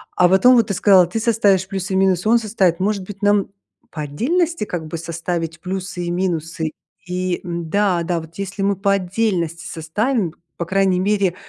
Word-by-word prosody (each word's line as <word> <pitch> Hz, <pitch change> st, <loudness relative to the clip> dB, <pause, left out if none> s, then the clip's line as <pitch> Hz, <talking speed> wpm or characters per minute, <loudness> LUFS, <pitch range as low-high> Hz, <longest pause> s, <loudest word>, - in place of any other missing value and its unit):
А 180 Hz, -, +5 dB
вот 190 Hz, +2 st, +4 dB
потом 250 Hz, 0 st, +7 dB
вот 230 Hz, -3 st, +4 dB
ты 200 Hz, -, -1 dB
сказала: 185 Hz, -2 st, +5 dB
"Ты 225 Hz, +6 st, -3 dB
составишь 205 Hz, -5 st, +2 dB
плюсы 195 Hz, -1 st, -4 dB
и -, -, +2 dB
минусы, 190 Hz, +1 st, +2 dB
он 235 Hz, -, +5 dB
составит." 195 Hz, -6 st, +1 dB
Может 200 Hz, 0 st, 0 dB
быть 195 Hz, +1 st, -10 dB
нам 205 Hz, -1 st, +3 dB, 0.4 s
по 155 Hz, -, -5 dB
отдельности 310 Hz, -, 0 dB
как 165 Hz, -5 st, -5 dB
бы 165 Hz, -, -5 dB
составить 170 Hz, 0 st, -4 dB
плюсы 185 Hz, -1 st, -4 dB
и 175 Hz, -, -2 dB
минусы, 165 Hz, -3 st, -2 dB, 0.4 s
и 180 Hz, -1 st, -2 dB
м-да, 175 Hz, +2 st, 0 dB
да 170 Hz, 0 st, -1 dB
вот, 160 Hz, +1 st, -14 dB
если 195 Hz, 0 st, -4 dB
мы 200 Hz, 0 st, +2 dB
по 200 Hz, +1 st, +2 dB
отдельности 180 Hz, -4 st, -1 dB
составим, 180 Hz, -, -1 dB, 0.2 s
по 170 Hz, -, -3 dB
крайней 190 Hz, 0 st, +2 dB
мере 195 Hz, -2 st, +1 dB
185 Hz, 190 wpm, -20 LUFS, 170-205 Hz, 0.4 s, потом